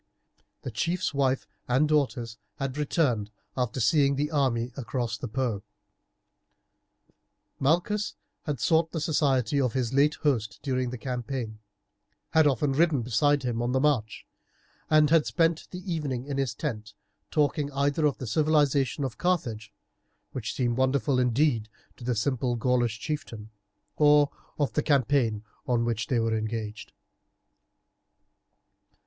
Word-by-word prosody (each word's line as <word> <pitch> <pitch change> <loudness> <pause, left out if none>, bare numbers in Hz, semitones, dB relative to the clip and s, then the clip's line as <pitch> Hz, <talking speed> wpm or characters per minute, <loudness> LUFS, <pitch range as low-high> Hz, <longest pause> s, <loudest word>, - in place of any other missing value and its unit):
The 130 - -4
chief's 170 +11 -1
wife 135 -2 +1 0.2
and 130 +5 +3
daughters 125 -7 0 0.2
had 135 -1 -3
returned 140 -8 0 0.3
after 125 -1 -1
seeing 140 +4 +3
the 145 +2 -1
army 125 -5 +1
across 120 -2 -3
the 105 - -5
Po. 115 -4 -2 2.0
Malchus 175 +9 +1 0.3
had 145 -5 -2
sought 160 +3 +2
the 165 - -1
society 140 -4 +1
of 125 -4 0
his 125 -2 -1
late 145 +3 +4
host 115 -8 0
during 130 -2 -1
the 125 - -5
campaign, 125 -3 -4 0.7
had 160 -2 +5
often 140 +1 +1
ridden 150 -3 +2
beside 135 +5 +2
him 120 -2 -1
on 120 +1 -1
the 130 - +3
march, 130 -7 0 0.6
and 155 -1 +5
had 165 -2 +4
spent 165 -1 +1
the 180 0 -5
evening 135 -6 -3
in 140 -1 -3
his 130 -6 -1
tent 110 -8 -5 0.3
talking 145 -1 +1
either 145 +2 +1
of 145 - -1
the 130 - -6
civilization 145 +1 +2
of 125 -6 -4
Carthage, 120 - -1 0.6
which 120 -4 -4
seemed 120 -2 0
wonderful 130 -1 +2
indeed 125 -2 +2 0.3
to - - -12
the 125 0 0
simple 125 +1 0
Gaulish 120 -2 +1
chieftain, 120 -8 -5 0.5
or 145 -1 +5 0.3
of 145 -2 0
the 150 - +1
campaign 130 -7 +2 0.2
on 120 -2 +1
which 115 -1 -1
they 125 - +1
were 115 0 +1
engaged. 110 -1 -4
130 Hz, 140 wpm, -27 LUFS, 115-150 Hz, 2.0 s, had